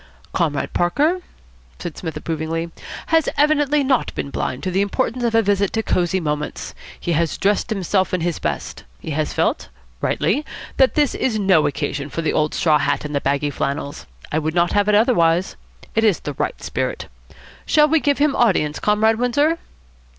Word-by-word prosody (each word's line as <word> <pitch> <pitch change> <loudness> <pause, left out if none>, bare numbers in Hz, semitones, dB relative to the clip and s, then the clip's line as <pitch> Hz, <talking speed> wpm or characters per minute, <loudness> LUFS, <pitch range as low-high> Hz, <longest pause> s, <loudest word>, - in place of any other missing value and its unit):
"Comrade 155 -5 -1
Parker," 300 - +1 0.6
said 170 - -6
Psmith 160 -3 -5
approvingly, 165 +1 -3 0.4
"has 325 -2 +4
evidently 295 -1 +3
not 265 -2 +1
been 140 - -4
blind 130 - -3
to 185 - -1
the 190 +2 +1
importance 245 +4 -1
of 230 -1 +1
a 225 - +5
visit 200 -1 +1
to 225 - 0
Cosy 180 -1 +1
Moments. 150 -3 -3 0.3
He 175 - -2
has 165 0 0
dressed 205 +4 +1
himself 190 -2 0
in 185 - -1
his 170 -1 -1
best. - - -4 0.2
He 160 - -6
has 150 +1 -1
felt, - - 0 0.3
rightly, 295 - +1 0.3
that 265 -1 +4
this 295 -3 +2
is 235 -4 0
no 190 -6 +3
occasion 140 0 -3
for 165 - -4
the 160 - 0
old 155 0 +1
straw 155 -5 +3
hat 145 0 0
and 150 - -5
the 140 - 0
baggy 140 +1 0
flannels. 140 0 -4 0.2
I 155 - +1
would 155 +1 -2
not 175 0 +3
have 205 0 +2
it 210 - +4
otherwise. 180 - +3 0.4
It 225 - +1
is 210 -7 +3
the 145 - -4
right - - -3
spirit. - - -3 0.6
Shall 300 -1 +5
we 320 +1 +3
give 285 -1 +1
him 290 0 +2
audience, 175 -10 +2
Comrade 220 +2 +2
Windsor?" 290 +7 +2
185 Hz, 185 wpm, -21 LUFS, 155-240 Hz, 0.6 s, a